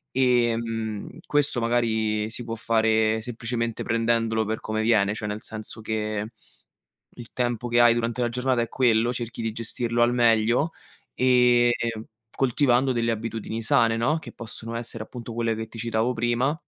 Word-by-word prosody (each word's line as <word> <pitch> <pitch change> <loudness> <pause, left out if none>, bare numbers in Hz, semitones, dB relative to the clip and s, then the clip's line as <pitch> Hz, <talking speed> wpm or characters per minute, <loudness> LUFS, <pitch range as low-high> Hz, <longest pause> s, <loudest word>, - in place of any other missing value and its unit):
Ehm, 115 -4 0 0.2
questo 145 -4 +1
magari 110 -2 0
si 120 +2 -4
può 115 0 -5
fare 110 -1 +2
semplicemente 115 0 -3
prendendolo 115 -1 +1
per 110 +1 -2
come 110 0 -2
viene, 105 -2 +3
cioè 105 - -4
nel 105 +1 -4
senso 110 0 -4
che 110 0 -3 0.8
il 120 -2 -10
tempo 120 -1 -2
che 120 0 +3
hai 120 -1 +6
durante 120 +1 -2
la 120 - +1
giornata 125 0 0
è 115 - -1
quello, 120 -2 +2
cerchi 120 -1 -5
di 115 - -1
gestirlo 115 +1 -1
al 120 +1 +4
meglio 120 +5 +3 0.4
e 125 -1 +4 0.6
coltivando 130 0 +2
delle 115 -1 0
abitudini 115 0 -4
sane, 115 0 +3
no, 150 +8 +1
che - - -10
possono 115 0 -6
essere, 115 -1 -5
appunto, 120 0 -9
quelle 115 -1 0
che 110 0 -5
ti 115 - -11
citavo 115 +2 0
prima, 120 +5 0
115 Hz, 160 wpm, -25 LUFS, 110-120 Hz, 0.8 s, hai